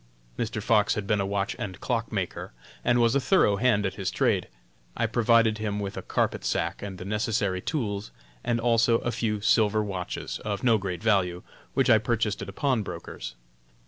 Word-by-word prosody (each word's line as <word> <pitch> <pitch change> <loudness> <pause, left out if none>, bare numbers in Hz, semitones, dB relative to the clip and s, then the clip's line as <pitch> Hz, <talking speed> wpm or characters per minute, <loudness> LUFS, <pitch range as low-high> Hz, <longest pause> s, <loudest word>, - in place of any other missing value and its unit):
Mr. - - -3
Fox - - +3
had 105 - -3
been 105 0 +1
a 95 - -1
watch 100 0 -1
and 95 -4 -5
clock - - -2
maker, - - -3 0.3
and 120 - +3
was 115 0 +4
a 140 - +3
thorough 130 - +3
hand 110 -3 +2
at 95 - -1
his 95 -1 -2
trade. - - +1 0.5
I - - +2
provided 115 -1 +3
him 105 -1 -2
with 100 -1 -4
a - - -4
carpet - - -1
sack - - -1
and 100 -2 -6
the 90 - -8
necessary 100 -2 0
tools, 105 - -2 0.3
and 115 -1 0
also 115 0 +3
a 120 - -1
few 105 -3 -1
silver 110 0 +3
watches, 95 -3 -4
of 100 -2 -3
no 115 -3 +4
great 95 0 -4
value, 95 -5 +1 0.3
which 135 - +3
I 110 - +7
purchased 110 -1 -1
at 100 - -5
a - - -5
pawn 130 +3 +1
broker's. 85 -10 -7
105 Hz, 195 wpm, -27 LUFS, 100-115 Hz, 0.5 s, I